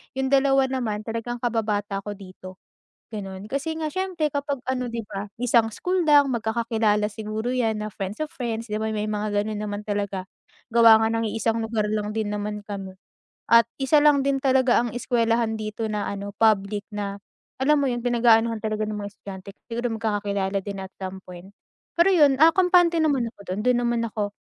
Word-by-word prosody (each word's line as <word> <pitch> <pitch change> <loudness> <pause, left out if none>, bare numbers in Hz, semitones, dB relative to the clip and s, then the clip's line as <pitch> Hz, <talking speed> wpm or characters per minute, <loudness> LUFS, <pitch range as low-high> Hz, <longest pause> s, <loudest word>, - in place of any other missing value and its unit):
'Yung 265 0 0
2 270 -1 +4
naman 235 -6 -2
talagang 230 +2 -4
kababata 215 -4 -1
ko 205 - -4
dito, 185 -1 -12 0.6
gano'n. 195 -1 -6
Kasi 280 +6 -2
nga 310 - -1
siyempre 365 -2 -1
kapag 285 -1 -3
ano 250 -2 -1
'di 230 - -2
ba, 200 -1 -5 0.2
isang 235 -2 +3
school 360 - -1
lang, 290 -2 +6
magkakakilala 220 -2 0
siguro 215 +1 -4
'yan 225 -4 0
na 215 - -3
friends 195 +4 -5
of 310 - -1
friends 230 -2 -4
'di 210 - -2
ba 220 - -1
may 215 0 -2
mga 210 0 -2
gano'n 210 0 -4
naman 205 0 -4
talaga, 200 -2 -3 0.4
gawa 230 -1 +7
nga 220 - +2
ng 225 0 0
iisang 225 +1 -1
lugar 220 -2 -1
lang 210 0 -2
din 220 -1 -2
naman 210 0 -4
kami 195 -2 -6 0.6
at 230 0 +7
1 275 +3 +4
lang 290 -2 +5
din 275 -1 +1
talaga 260 -3 +3
ang 240 - -2
eskuwelahan 230 -2 +1
dito 215 +1 -4
na 210 -1 -2
ano 200 0 -5
public 210 -1 +2
na, 200 -1 -5 0.4
alam 300 +3 +4
mo - - +1
'yun 240 0 -3
pinag-aanuhan 230 -1 +3
talaga 215 0 -1
ng 210 - -4
mga 205 -1 -5
estudyante, 190 -1 -10 0.2
siguro 240 +1 -2
magkakakilala 205 -3 -1
din 200 -1 -5
at 190 - -7
some 190 0 -6
point. 180 +2 -12 0.4
Pero 345 +3 +5
'yun, 295 -7 +4
ah, 320 - +9
kampante 355 -2 +4
naman 275 -7 +1
ako - - -35
do'n, 195 - -4
dun 250 -1 +4
naman 235 -1 +1
ako, 210 -2 -3
225 Hz, 190 wpm, -24 LUFS, 205-250 Hz, 0.6 s, ah